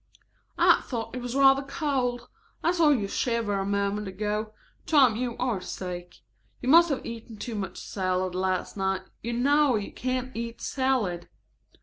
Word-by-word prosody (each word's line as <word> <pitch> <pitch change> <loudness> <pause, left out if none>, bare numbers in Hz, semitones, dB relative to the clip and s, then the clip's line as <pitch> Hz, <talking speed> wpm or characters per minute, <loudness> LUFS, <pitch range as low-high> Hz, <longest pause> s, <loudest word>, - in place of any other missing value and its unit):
"I - - +5
thought 235 -1 -4
it 250 - -4
was 245 +1 -4
rather 270 0 +6
cold. 270 -5 -2 0.4
I 340 - +3
saw 335 -4 +4
you 235 -9 +2
shiver 230 0 -1
a 195 - -1
moment 200 +1 -1
ago. 210 +3 -2 0.4
Tom, 265 -8 +5
you 240 0 -3
are 240 -7 -1
sick. 180 -1 -7 0.4
You 255 - -3
must 335 +3 +7
have 280 - -2
eaten 230 -1 -8
too 235 - -5
much 195 -4 -4
salad 185 -1 -2
last 185 0 -1
night. 190 -1 -1 0.2
You 235 +1 -3
know 280 +2 +3
you 210 -2 -3
can't 255 0 -3
eat 230 0 -5
salad." 245 -11 -1
230 Hz, 160 wpm, -27 LUFS, 200-260 Hz, 0.4 s, must